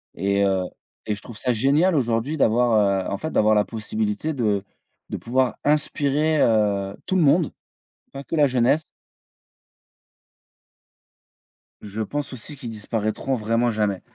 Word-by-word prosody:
et 100 Hz, +2 st, +1 dB
heu 95 Hz, -1 st, +1 dB, 0.4 s
et 105 Hz, -, -1 dB
je 105 Hz, -, -9 dB
trouve 115 Hz, -4 st, -11 dB
ça 125 Hz, 0 st, 0 dB
génial 145 Hz, +10 st, +3 dB
aujourd'hui 120 Hz, +2 st, 0 dB
d'avoir, 110 Hz, -7 st, +2 dB
heu, -, -, -3 dB
en 100 Hz, -, -2 dB
fait 160 Hz, +10 st, -5 dB
d'avoir 110 Hz, 0 st, +3 dB
la 105 Hz, -, +4 dB
possibilité 180 Hz, -, -3 dB
de 105 Hz, -7 st, 0 dB, 0.5 s
de -, -, -4 dB
pouvoir 130 Hz, +1 st, 0 dB
inspirer, 150 Hz, +1 st, +2 dB
heu, 100 Hz, -3 st, +2 dB
tout 190 Hz, -, -1 dB
le 185 Hz, -, +3 dB
monde, 160 Hz, +2 st, +3 dB, 0.6 s
pas 135 Hz, 0 st, -7 dB
que 165 Hz, -, -4 dB
la 145 Hz, -, +5 dB
jeunesse 130 Hz, +4 st, +2 dB, 3.0 s
Je 105 Hz, +1 st, -6 dB
pense 145 Hz, +7 st, -3 dB
aussi 130 Hz, +4 st, -7 dB
qu'ils 130 Hz, -4 st, -7 dB
disparaîtront 110 Hz, +4 st, -2 dB
vraiment 115 Hz, +1 st, +1 dB
jamais. 105 Hz, -4 st, -1 dB
120 Hz, 145 wpm, -23 LUFS, 105-145 Hz, 3.0 s, la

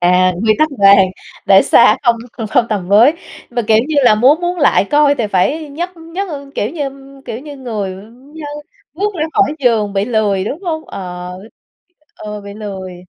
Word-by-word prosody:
À. 180 Hz, +1 st, +3 dB
Quy 220 Hz, -, +4 dB
tắc 310 Hz, -, +3 dB
vàng 195 Hz, -1 st, +6 dB, 0.4 s
để -, -, +6 dB
xa -, -, +5 dB
không 235 Hz, -3 st, +3 dB, 0.3 s
không 235 Hz, -, +2 dB
tầm 200 Hz, -5 st, -3 dB
với. 225 Hz, +9 st, +6 dB, 0.4 s
Mà, 240 Hz, -1 st, -1 dB
kiểu, 220 Hz, -, +5 dB
như 310 Hz, -, -2 dB
là 230 Hz, -, +6 dB
muốn 260 Hz, +9 st, +4 dB
muốn 350 Hz, 0 st, -2 dB
lại 285 Hz, -8 st, +3 dB
coi 290 Hz, +3 st, +3 dB
thì 240 Hz, -6 st, -2 dB
phải 275 Hz, -, 0 dB
nhấc 345 Hz, +5 st, -6 dB
nhấc, 330 Hz, +4 st, -6 dB, 0.3 s
kiểu 210 Hz, -, -2 dB
như 290 Hz, -4 st, -3 dB, 0.3 s
kiểu 225 Hz, -, -6 dB
như, 285 Hz, +1 st, -10 dB
người 220 Hz, -7 st, -4 dB, 0.4 s
như 320 Hz, -, -9 dB, 0.5 s
bước 410 Hz, +3 st, -2 dB
ra 310 Hz, -3 st, -1 dB
khỏi 395 Hz, -8 st, +2 dB
giường 225 Hz, -6 st, +1 dB
bị 195 Hz, 0 st, 0 dB
lười, 210 Hz, -4 st, 0 dB
đúng 305 Hz, -, -5 dB
hông? 320 Hz, -3 st, -3 dB
Ờ, 180 Hz, -1 st, -7 dB, 0.8 s
ừ, 210 Hz, 0 st, -7 dB
bị 200 Hz, -, -9 dB
lười. 190 Hz, -4 st, -8 dB
230 Hz, 180 wpm, -15 LUFS, 200-305 Hz, 0.8 s, vàng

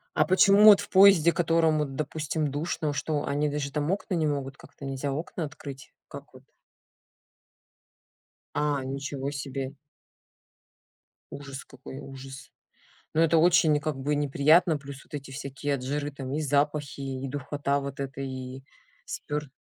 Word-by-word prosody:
А -, -, +4 dB
почему 200 Hz, +2 st, +6 dB
вот 210 Hz, -2 st, +10 dB
в 205 Hz, -, -6 dB
поезде, 190 Hz, -4 st, +7 dB
в -, -, -9 dB
котором 165 Hz, -2 st, +2 dB
вот 140 Hz, -3 st, -2 dB
допустим, 155 Hz, 0 st, -2 dB
душно, 150 Hz, 0 st, -2 dB
что 145 Hz, +1 st, -2 dB
они 145 Hz, +1 st, 0 dB
даже 145 Hz, -1 st, -3 dB
там 150 Hz, +2 st, -1 dB
окна 195 Hz, 0 st, -2 dB
не 160 Hz, -3 st, +1 dB
могут, 140 Hz, -1 st, -3 dB
как-то 140 Hz, -, -12 dB
нельзя 135 Hz, +1 st, -3 dB
окна 160 Hz, +4 st, -4 dB
открыть, 140 Hz, -2 st, -10 dB, 0.2 s
как 140 Hz, 0 st, -9 dB
вот? 130 Hz, +1 st, -15 dB, 2.1 s
А, 145 Hz, -2 st, 0 dB
ничего 140 Hz, +1 st, -4 dB
себе. 135 Hz, -1 st, -5 dB, 1.6 s
Ужас 140 Hz, -1 st, -8 dB
какой, 130 Hz, +1 st, -10 dB
ужас! 135 Hz, 0 st, -10 dB, 0.6 s
Но 160 Hz, -, +3 dB
это 165 Hz, 0 st, +4 dB
очень 165 Hz, -3 st, +5 dB
как 155 Hz, 0 st, -2 dB
бы 145 Hz, +2 st, -1 dB
неприятно, 150 Hz, +4 st, +4 dB
плюс 140 Hz, -1 st, -10 dB
вот -, -, -25 dB
эти 140 Hz, -2 st, -6 dB
всякие 140 Hz, +1 st, -3 dB
от 125 Hz, -, -7 dB
жары 145 Hz, +2 st, -2 dB
там 135 Hz, -1 st, -6 dB
и 155 Hz, -, -1 dB
запахи, 145 Hz, 0 st, 0 dB
и 135 Hz, 0 st, -4 dB
духота 140 Hz, +1 st, -2 dB
вот 140 Hz, 0 st, -6 dB
эта, 135 Hz, 0 st, -5 dB
и 130 Hz, 0 st, -6 dB, 0.4 s
спёр 150 Hz, 0 st, -4 dB
145 Hz, 155 wpm, -27 LUFS, 135-155 Hz, 2.1 s, вот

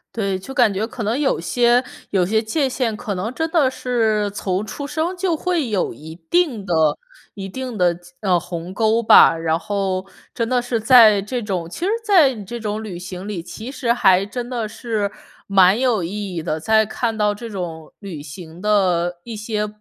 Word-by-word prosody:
对， 195 Hz, -4 st, -1 dB
就 270 Hz, +8 st, -9 dB
感 245 Hz, -6 st, +3 dB
觉 200 Hz, +3 st, -1 dB
可 230 Hz, 0 st, -6 dB
能 225 Hz, +6 st, 0 dB
有 285 Hz, -2 st, +1 dB
些 240 Hz, 0 st, +2 dB, 0.3 s
有 185 Hz, -3 st, +2 dB
些 220 Hz, +4 st, +1 dB
界 270 Hz, +6 st, 0 dB
限， 250 Hz, -4 st, -1 dB
可 210 Hz, -2 st, -4 dB
能 195 Hz, +5 st, -3 dB
真 320 Hz, +4 st, -2 dB
的 305 Hz, -6 st, +3 dB
是 220 Hz, -5 st, 0 dB
从 195 Hz, 0 st, -2 dB
出 280 Hz, +7 st, -6 dB
生 325 Hz, +5 st, -2 dB
就 360 Hz, -2 st, 0 dB
会 325 Hz, -5 st, -1 dB
有 200 Hz, -4 st, -1 dB
一 155 Hz, +6 st, -11 dB
定 295 Hz, -, +1 dB
的 180 Hz, -, -1 dB, 0.6 s
一 195 Hz, -1 st, -6 dB
定 250 Hz, +3 st, -6 dB
的， 175 Hz, -2 st, +2 dB, 0.2 s
呃， 185 Hz, -4 st, +2 dB
鸿 175 Hz, 0 st, -7 dB
沟 225 Hz, +2 st, +2 dB
吧。 165 Hz, -, +7 dB
然 165 Hz, 0 st, 0 dB
后 195 Hz, -1 st, -2 dB, 0.3 s
真 230 Hz, -2 st, -1 dB
的 250 Hz, -1 st, +2 dB
是 240 Hz, -1 st, -2 dB
在 220 Hz, -3 st, +7 dB
这 240 Hz, +5 st, -4 dB
种 185 Hz, -6 st, -3 dB
其 340 Hz, -, -4 dB
实 395 Hz, -, +1 dB
在 355 Hz, -11 st, +5 dB
这 235 Hz, +5 st, -7 dB
种 215 Hz, 0 st, -3 dB
旅 195 Hz, -5 st, -6 dB
行 185 Hz, +2 st, -7 dB
里， 195 Hz, -6 st, -4 dB
其 220 Hz, +8 st, -8 dB
实 245 Hz, -4 st, 0 dB
还 190 Hz, -5 st, +4 dB
真 240 Hz, +4 st, -5 dB
的 235 Hz, -4 st, -2 dB
是 220 Hz, -2 st, -3 dB, 0.3 s
蛮 195 Hz, +1 st, +4 dB
有 245 Hz, -7 st, +1 dB
意 195 Hz, +1 st, -4 dB
义 165 Hz, -, -2 dB
的。 155 Hz, -1 st, -2 dB
在 220 Hz, +6 st, +3 dB
看 225 Hz, +1 st, -2 dB
到 210 Hz, -1 st, +1 dB
这 230 Hz, +2 st, -8 dB
种 170 Hz, -6 st, -6 dB
旅 185 Hz, -8 st, -7 dB
行 160 Hz, +3 st, -10 dB
的 180 Hz, -4 st, +1 dB
一 235 Hz, -2 st, -7 dB
些， 210 Hz, 0 st, -2 dB
210 Hz, 210 characters per minute, -20 LUFS, 185-245 Hz, 0.6 s, 吧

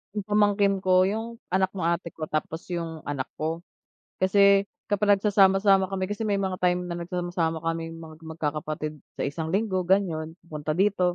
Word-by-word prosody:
yung 210 Hz, -, -2 dB
pamangkin 205 Hz, -1 st, +2 dB
ko 185 Hz, -1 st, +4 dB
yung 225 Hz, +4 st, -2 dB, 0.2 s
anak 190 Hz, 0 st, +2 dB
ng 185 Hz, -, -3 dB
ate 170 Hz, 0 st, 0 dB
ko 160 Hz, -, -6 dB
tapos 155 Hz, +1 st, -3 dB
yung 165 Hz, -2 st, -4 dB
anak 140 Hz, -2 st, -3 dB
ko. 160 Hz, +2 st, -2 dB, 0.6 s
Kasi 200 Hz, +1 st, +5 dB, 0.2 s
kapag 205 Hz, 0 st, +4 dB
nagsasama-sama 195 Hz, -1 st, +4 dB
kami 190 Hz, 0 st, -3 dB
kasi 210 Hz, +2 st, -2 dB
may 205 Hz, -, +1 dB
mga 190 Hz, -2 st, -2 dB
time 180 Hz, 0 st, +2 dB
na 170 Hz, -, -3 dB
nagsasama-sama 170 Hz, -2 st, -2 dB
kaming 165 Hz, 0 st, -3 dB
magkakapatid 155 Hz, -1 st, -5 dB, 0.2 s
sa -, -, -3 dB
isang 160 Hz, +3 st, -3 dB
linggo 190 Hz, -4 st, 0 dB
ganon 165 Hz, -5 st, +1 dB
pupunta 155 Hz, -2 st, -4 dB
dito. 185 Hz, -1 st, +2 dB
180 Hz, 160 wpm, -26 LUFS, 160-195 Hz, 0.6 s, Kasi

